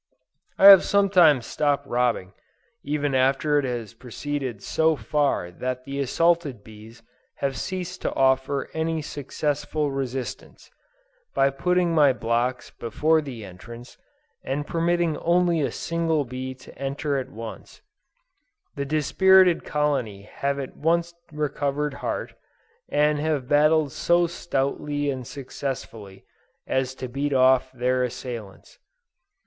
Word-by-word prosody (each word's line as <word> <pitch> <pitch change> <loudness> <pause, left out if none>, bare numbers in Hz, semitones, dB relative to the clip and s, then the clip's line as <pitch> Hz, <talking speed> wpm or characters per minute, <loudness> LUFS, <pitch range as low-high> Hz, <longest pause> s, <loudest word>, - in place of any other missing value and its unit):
I 195 - +4
have 195 -2 +11
sometimes 180 -10 +4
stopped 145 -1 0
robbing, 120 -7 0 0.5
even 145 -1 -1
after 135 +3 +2
it 140 - -1
had 115 -3 -5
proceeded 130 -3 -5
so 160 0 +2
far 140 -6 -1
that 125 +6 -4
the 140 0 -5
assaulted 150 -4 +1
bees 110 +2 -14 0.3
had 135 -1 -2
ceased 180 +2 -5
to - - -2
offer 135 +1 +1
any 160 0 -1
successful 145 +1 -2
resistance, 135 -2 -5 0.6
by 135 0 +3
putting 180 +4 +1
my 145 -4 +5
blocks 120 +1 -1
before 155 +7 +1
the 125 -7 -8
entrance, 115 +6 -12 0.4
and 145 +2 -3
permitting 170 0 0
only 175 -1 +2
a 140 - 0
single 165 -3 -1
bee 130 +1 -6
to 130 - -15
enter 140 +1 -2
at 130 - -6
once: 115 +1 -10 0.9
the 140 - -3
dispirited 180 +5 +4
colony 135 -9 -1
have 140 +6 -3
at 135 -2 -6
once 170 +2 0 0.2
recovered 150 -1 -2
heart, - - -3 0.6
and 150 0 +2
have 150 -4 -1
battled 150 0 +3
so 175 +4 +2
stoutly 145 -3 -2
and 130 -3 -6
successfully, 125 -7 -7 0.4
as 130 0 -1
to 130 - -6
beat 140 +3 -2
off 130 0 +4
their 125 0 0
assailants. 120 -5 -7
140 Hz, 125 wpm, -24 LUFS, 125-155 Hz, 0.9 s, have